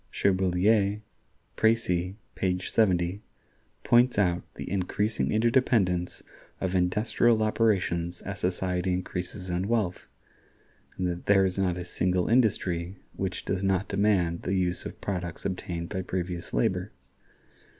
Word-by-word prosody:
Cherbuliez 100 +2 +2 0.5
("Précis," 95 -5 +1 0.2
page 90 -1 -1
70) 95 -2 +2 0.6
points 120 0 +4
out 90 -3 +2
the - - -7
increasing 95 -5 -1
interdependence 110 -6 +2 0.4
of 95 -1 -2
industrial 105 +5 +2
operations 95 -6 +1
as 100 0 -6
society 90 0 0
increases 90 +1 -4
in 90 +2 -1
wealth, 105 -6 -1 0.9
and 90 - -1
that 90 0 -3
there 95 -1 +5
is 95 0 -1
not 90 -2 +1
a 90 - -5
single 90 0 0
industry 95 -6 +1 0.2
which 95 -1 -4
does 95 0 -1
not 95 0 +1
demand 100 -5 +1
the 95 - -1
use 90 -1 -1
of - - -11
products 90 -4 -4
obtained 90 -3 -3
by 95 -2 -2
previous 90 -1 -4
labor. - - 0
95 Hz, 125 wpm, -27 LUFS, 90-100 Hz, 0.9 s, there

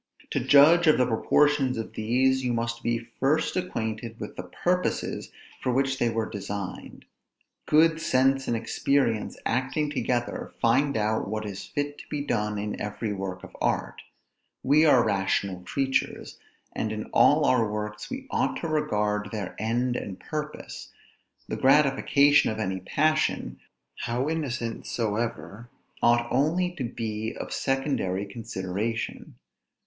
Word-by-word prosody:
To - - +1
judge 160 +5 +6
of 155 - +6
the 125 - +4
proportions 135 +3 +2
of 115 - -5
these, 130 +4 +1
you 125 -1 0
must 115 0 -2
be 115 0 -2
first 155 +4 +1
acquainted 115 -9 -3
with 105 - -7
the 90 0 -8 0.2
purposes 180 +1 0 0.3
for 125 - 0
which 135 +1 +1
they 120 - +2
were 115 -1 -1
designed. 100 -2 -6 0.6
Good 160 +1 +4
sense 135 -1 +2
and 120 - +1
experience 115 0 0
acting 130 +5 0
together, 125 -4 -2
find 135 +3 +2
out 110 0 0
what 110 +1 -3
is 100 -2 -6
fit 145 0 -3
to - - -12
be 145 - -2
done 105 -5 -1
in 105 +1 -4
every 105 +1 -3
work 95 -2 -5
of - - -12
art. - - -1 0.6
We 150 +4 +5
are 130 -5 +5
rational 95 -2 0
creatures, 135 +8 -2 0.3
and 110 - -2
in 110 0 -3
all 150 0 +5
our 115 -6 +3
works 105 0 -5
we 265 0 -6
ought - - +1
to 165 - -2
regard 105 -9 0
their 105 -4 -5
end 120 +3 0
and 95 -5 -5
purpose; 150 - -6 0.6
the - - -3
gratification 140 +1 +4
of 110 - -3
any 95 -3 -2
passion, 155 +11 0 0.4
how 120 +4 -2
innocent 130 -8 -3
soever, 115 0 -3 0.3
ought 120 0 +4
only 160 +8 +2
to 135 - -2
be 110 -2 -4
of - - -5
secondary 135 -8 -1
consideration. 105 - -4
120 Hz, 145 wpm, -26 LUFS, 105-140 Hz, 0.6 s, judge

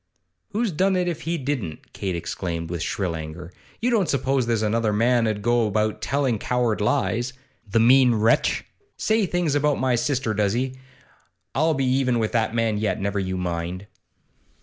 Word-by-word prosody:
'Who's 220 0 -1
done 190 +4 +2
it, 180 -1 +1
if 170 -3 -3
he 170 - 0
didn't?' 130 - -4
Kate 95 -3 -3
exclaimed, 85 -1 -4
with 85 -2 -3
shrill 85 0 -2
anger. 80 +2 -7 0.3
'You 245 +2 +1
don't 200 -9 +2
suppose 135 -2 +1
there's 115 -2 +1
another 110 0 +1
man 115 +2 +2
'ud 105 -1 -2
go 120 -1 +2
about 105 +1 0
telling 135 -6 0
coward 120 -3 0
lies? 120 +1 0 0.4
The 115 - +2
mean 125 +1 +6
wretch! 110 +1 +2 0.3
Says 220 -4 +1
things 175 -4 0
about 145 0 +2
my 130 -1 +1
sister, 120 -1 0
does 105 -1 +1
he? 130 +2 -1 0.8
I'll 160 0 +2
be 135 -1 0
even 130 -1 +2
with 110 -2 0
that 115 -1 0
man 115 -2 +1
yet, 105 - -1
never 100 +1 -1
you 95 -1 -2
mind. 90 +1 -3
115 Hz, 175 wpm, -24 LUFS, 105-135 Hz, 0.8 s, mean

